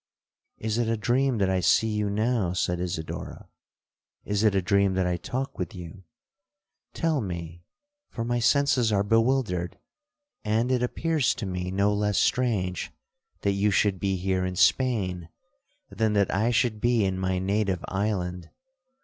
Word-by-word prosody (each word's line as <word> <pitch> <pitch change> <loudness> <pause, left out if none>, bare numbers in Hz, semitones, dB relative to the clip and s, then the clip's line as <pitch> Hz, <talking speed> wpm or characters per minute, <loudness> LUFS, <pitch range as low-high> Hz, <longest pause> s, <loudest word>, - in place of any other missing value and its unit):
'—'Is 110 +1 -2
it 120 - +1
a 115 0 0
dream 125 +3 +1
that 95 -2 +1
I 95 - +1
see 105 +5 +3
you 105 -1 -1
now?' 105 -3 0
said 90 -1 -1
Isidora—'is 90 +4 -6
it 105 -2 +3
a 95 - +3
dream 100 0 +2
that 95 -1 +1
I 90 0 0
talk 130 +10 -4
with 90 0 -4
you?—Tell 155 - -7
me, 85 -3 -6 0.5
for 115 - -4
my 120 0 0
senses 130 -2 +3
are 100 -1 +2
bewildered; 115 -5 +1 0.7
and 110 +4 +1
it 125 -1 +2
appears 155 +3 0
to 115 - -5
me 90 -1 -3
no 100 +2 +1
less 105 0 0
strange, 100 -8 0 0.5
that 100 - +1
you 100 +1 +1
should 100 -1 +1
be 95 +1 0
here 95 0 -1
in 90 0 -3
Spain, 90 -8 +1 0.6
than 110 -2 0
that 100 -2 +2
I 110 +5 +2
should 115 -2 +1
be 120 -3 +2
in 95 -1 -1
my 95 0 0
native 95 -1 -1
island. 90 -4 -2
100 Hz, 155 wpm, -26 LUFS, 90-115 Hz, 0.7 s, see